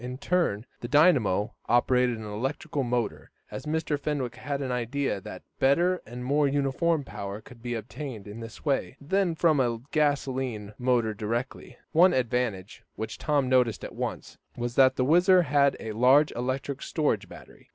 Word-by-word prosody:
In 125 Hz, +1 st, -5 dB
turn, 140 Hz, -, 0 dB
the 120 Hz, -, -5 dB
dynamo 125 Hz, -, +3 dB, 0.2 s
operated 125 Hz, 0 st, +3 dB
an 110 Hz, -, -8 dB
electrical 135 Hz, +8 st, -3 dB
motor, 120 Hz, -3 st, -2 dB, 0.2 s
as 135 Hz, -, -7 dB
Mr. 155 Hz, -1 st, -1 dB
Fenwick 140 Hz, -4 st, -2 dB
had 140 Hz, -1 st, -3 dB
an 135 Hz, -2 st, -3 dB
idea 125 Hz, -2 st, -1 dB
that -, -, -9 dB, 0.2 s
better, 175 Hz, +7 st, +3 dB
and 125 Hz, +2 st, -7 dB
more 145 Hz, +2 st, +2 dB
uniform, 145 Hz, +3 st, +1 dB
power 100 Hz, -5 st, -6 dB
could 115 Hz, +1 st, -15 dB
be 120 Hz, 0 st, -3 dB
obtained 115 Hz, -1 st, -7 dB
in 105 Hz, +2 st, -8 dB
this 115 Hz, +5 st, -10 dB
way, 140 Hz, -2 st, -1 dB
than 175 Hz, +3 st, 0 dB
from 160 Hz, -3 st, +3 dB
a 120 Hz, -3 st, +1 dB
gasolene 130 Hz, -8 st, -1 dB
motor 120 Hz, -3 st, +1 dB
direct. 115 Hz, +5 st, -3 dB, 0.4 s
One 175 Hz, +3 st, +5 dB
advantage 120 Hz, -6 st, -1 dB
which 110 Hz, 0 st, -5 dB
Tom 145 Hz, -3 st, +1 dB
noticed 125 Hz, -4 st, +2 dB
at -, -, -7 dB
once, -, -, -5 dB, 0.2 s
was 120 Hz, 0 st, -3 dB
that 130 Hz, 0 st, +5 dB
the 130 Hz, -, +1 dB
WHIZZER 180 Hz, +4 st, +5 dB
had 140 Hz, -1 st, +3 dB
a 110 Hz, -, -5 dB
large 130 Hz, +7 st, +4 dB
electric 130 Hz, +3 st, -3 dB
storage 115 Hz, -, -1 dB
battery. -, -, -14 dB
130 Hz, 165 wpm, -27 LUFS, 120-145 Hz, 0.4 s, One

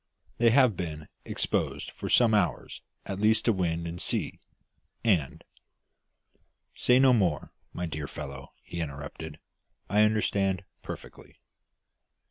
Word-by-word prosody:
They 120 Hz, 0 st, +6 dB
have 125 Hz, -3 st, +5 dB
been 75 Hz, -4 st, -5 dB, 0.2 s
exposed -, -, -2 dB
for -, -, -6 dB
some 115 Hz, -3 st, +5 dB
hours 105 Hz, -, 0 dB, 0.2 s
at 95 Hz, 0 st, -4 dB
least 110 Hz, +1 st, +3 dB
to 115 Hz, -, +4 dB
wind 85 Hz, -3 st, -1 dB
and 85 Hz, +1 st, -5 dB
sea, -, -, -2 dB, 0.6 s
and 90 Hz, -, +1 dB, 0.7 s
" -, -, -43 dB, 0.3 s
"Say 125 Hz, -, +4 dB
no 130 Hz, -1 st, +6 dB
more, 90 Hz, -10 st, +1 dB, 0.2 s
my 90 Hz, -, -3 dB
dear 75 Hz, -3 st, -4 dB
fellow," 70 Hz, -2 st, -8 dB
he 85 Hz, -, -6 dB
interrupted; 75 Hz, +1 st, -6 dB, 0.5 s
"I 105 Hz, +1 st, +5 dB
understand 100 Hz, -3 st, +2 dB, 0.2 s
perfectly." -, -, -9 dB
95 Hz, 125 wpm, -28 LUFS, 80-110 Hz, 0.7 s, They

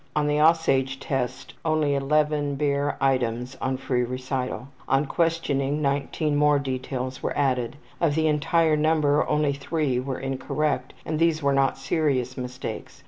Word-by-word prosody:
On 150 Hz, -1 st, +2 dB
the 150 Hz, 0 st, +1 dB
``Aussage'' 150 Hz, -4 st, +3 dB
Test 130 Hz, -2 st, -3 dB
he -, -, -24 dB
gave -, -, -32 dB
only 155 Hz, -2 st, +1 dB
11 145 Hz, +1 st, +1 dB
bare 140 Hz, 0 st, 0 dB
items 125 Hz, -1 st, 0 dB
on 130 Hz, 0 st, -1 dB
free 130 Hz, -1 st, 0 dB
recital. 130 Hz, +1 st, -3 dB, 0.2 s
On 135 Hz, +2 st, +2 dB
questioning 150 Hz, -4 st, 0 dB
19 145 Hz, +1 st, 0 dB
more 150 Hz, 0 st, +4 dB
details 130 Hz, -1 st, -4 dB
were -, -, -2 dB
added. 130 Hz, -3 st, 0 dB, 0.2 s
Of 155 Hz, -4 st, +2 dB
the 160 Hz, 0 st, +2 dB
entire 155 Hz, +1 st, +3 dB
number 150 Hz, -1 st, +2 dB
only 150 Hz, -1 st, +2 dB
3 140 Hz, -2 st, -1 dB
were 130 Hz, 0 st, -3 dB
incorrect, 135 Hz, 0 st, -2 dB
and 155 Hz, -1 st, -2 dB
these 165 Hz, -2 st, +2 dB
were 140 Hz, 0 st, +3 dB
not 135 Hz, -1 st, +2 dB
serious 135 Hz, -3 st, 0 dB
mistakes. 125 Hz, -3 st, -6 dB
140 Hz, 155 wpm, -25 LUFS, 130-150 Hz, 0.2 s, more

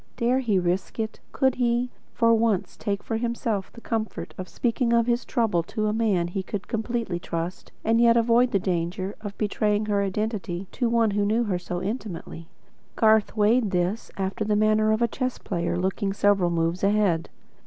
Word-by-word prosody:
Dare 245 Hz, +2 st, +2 dB
he 225 Hz, -7 st, +1 dB
risk 180 Hz, +1 st, -1 dB
it? 220 Hz, 0 st, -3 dB
Could 265 Hz, -2 st, +2 dB
he, 240 Hz, +1 st, +1 dB, 0.2 s
for 230 Hz, -1 st, +4 dB
once 220 Hz, -4 st, +1 dB
take 200 Hz, -1 st, -3 dB
for 225 Hz, -, -2 dB
himself 230 Hz, -4 st, -2 dB
the 235 Hz, -, -13 dB
comfort 215 Hz, -8 st, -3 dB
of 185 Hz, -, -7 dB
speaking 235 Hz, 0 st, 0 dB
of 235 Hz, -1 st, +4 dB
his 240 Hz, 0 st, +1 dB
trouble 225 Hz, -9 st, +1 dB
to 215 Hz, +6 st, -3 dB
a 210 Hz, -, +1 dB
man 210 Hz, -6 st, +1 dB
he 190 Hz, +2 st, -2 dB
could 195 Hz, +1 st, -5 dB
completely 225 Hz, -5 st, -2 dB
trust, 170 Hz, +1 st, -5 dB
and 225 Hz, +1 st, +3 dB
yet 235 Hz, 0 st, +6 dB
avoid 235 Hz, +2 st, +4 dB
the 200 Hz, -, +2 dB
danger 185 Hz, +1 st, -2 dB
of 205 Hz, -2 st, -7 dB
betraying 210 Hz, 0 st, 0 dB
her 205 Hz, -1 st, +1 dB
identity 195 Hz, -2 st, -2 dB
to 240 Hz, -, 0 dB
one 230 Hz, -2 st, +3 dB
who 205 Hz, 0 st, +1 dB
knew 220 Hz, +4 st, +2 dB
her 190 Hz, -5 st, -1 dB
so 175 Hz, 0 st, -4 dB
intimately? 190 Hz, -6 st, -5 dB, 0.5 s
Garth 220 Hz, 0 st, +3 dB
weighed 215 Hz, +2 st, +3 dB
this, 180 Hz, +4 st, -1 dB
after 195 Hz, +2 st, -2 dB
the 210 Hz, 0 st, +1 dB
manner 215 Hz, 0 st, +3 dB
of 220 Hz, +2 st, +2 dB
a -, -, +4 dB
chess 255 Hz, +2 st, -3 dB
player 170 Hz, -2 st, -2 dB
looking 190 Hz, +2 st, -1 dB
several 200 Hz, -3 st, +3 dB
moves 170 Hz, +2 st, -1 dB
ahead. 200 Hz, -5 st, +2 dB
210 Hz, 185 wpm, -25 LUFS, 185-230 Hz, 0.5 s, yet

